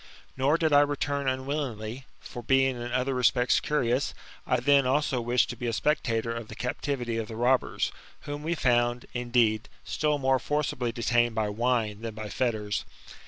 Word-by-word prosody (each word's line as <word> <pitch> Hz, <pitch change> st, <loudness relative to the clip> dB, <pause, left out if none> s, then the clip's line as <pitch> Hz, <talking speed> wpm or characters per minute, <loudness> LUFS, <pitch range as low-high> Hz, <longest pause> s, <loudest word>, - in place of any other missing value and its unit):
Nor 140 Hz, +4 st, +2 dB
did 160 Hz, -2 st, +1 dB
I 145 Hz, -, +8 dB
return 145 Hz, -1 st, 0 dB
unwillingly; 130 Hz, -3 st, -3 dB
for, 120 Hz, -, -8 dB
being 135 Hz, +1 st, +3 dB
in 120 Hz, 0 st, -5 dB
other 130 Hz, +2 st, 0 dB
respects 125 Hz, -1 st, +3 dB
curious, 130 Hz, -3 st, 0 dB, 0.3 s
I -, -, +2 dB
then 140 Hz, +1 st, +4 dB
also 135 Hz, -1 st, +1 dB
wished 120 Hz, +1 st, +1 dB
to -, -, -7 dB
be 120 Hz, -, -4 dB
a 115 Hz, -, -1 dB
spectator 115 Hz, -4 st, 0 dB
of 115 Hz, -1 st, -6 dB
the 110 Hz, -, -9 dB
captivity 125 Hz, -2 st, -2 dB
of 110 Hz, -1 st, -3 dB
the 110 Hz, -, -7 dB
robberS) 125 Hz, +3 st, +1 dB, 0.3 s
whom 145 Hz, 0 st, -6 dB
we 165 Hz, +3 st, -1 dB
found, 120 Hz, -3 st, +1 dB
indeed, 120 Hz, -3 st, +1 dB
still 150 Hz, -1 st, 0 dB
more 135 Hz, -1 st, +2 dB
forcibly 145 Hz, -5 st, -1 dB
detained 120 Hz, 0 st, +1 dB
by 110 Hz, -2 st, 0 dB
wine 110 Hz, -1 st, 0 dB
than 115 Hz, -2 st, -5 dB
by 110 Hz, -1 st, -6 dB
fetters. 105 Hz, -4 st, -1 dB
125 Hz, 170 wpm, -28 LUFS, 115-140 Hz, 0.3 s, I